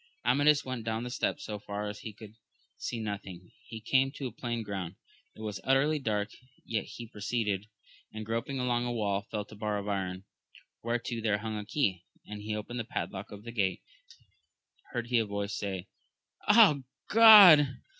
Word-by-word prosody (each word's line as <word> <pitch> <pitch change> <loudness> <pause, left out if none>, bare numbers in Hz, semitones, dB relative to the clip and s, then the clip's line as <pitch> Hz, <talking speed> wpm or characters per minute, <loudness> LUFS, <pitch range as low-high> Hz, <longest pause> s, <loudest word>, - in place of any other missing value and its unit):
Amadis 145 +4 +4
went 130 -3 -4
down 110 +1 -2
the 125 - -5
steps - - -2
so 105 -1 -5
far 105 +1 -5
that 105 0 -6
he 110 - -7
could 105 0 -13 0.4
see 120 - -4
nothing; 100 -4 -6 0.2
he 110 - -7
came 130 +4 +2
to 140 - -6
a 125 - -3
plain 120 -2 -4
ground, 95 -4 -5 0.4
it - - -12
was 105 -3 -5
utterly 140 +3 +2
dark, 105 -5 -1 0.4
yet 115 - -2
he 120 - -9
proceeded, 105 -2 -2 0.4
and 110 0 -7
groping 115 +5 -3
along 120 -1 0
a 120 - -2
wall 100 -4 -1
felt 105 -1 -5
a - - -10
bar 105 0 -2
of 100 0 -5
iron, 95 -2 -3 0.6
whereto 115 0 -2
there 105 -2 +1
hung 110 +1 -5
a 105 -1 -5
key, 100 - 0 0.2
and 105 0 -8
he 105 +1 -3
opened 115 +3 -5
the - - -1
padlock 100 -2 -5
of 105 0 -10
the 115 - -7
grate; 100 -5 -1 0.3
then - - -30 0.7
heard 120 -2 -3
he 120 -2 +3
a 115 - +1
voice, 100 0 -3
say 100 -3 -3
ing, 90 - -9 0.6
Ah, 210 -8 +7 0.3
God 195 -11 +9
110 Hz, 190 wpm, -30 LUFS, 105-120 Hz, 0.7 s, God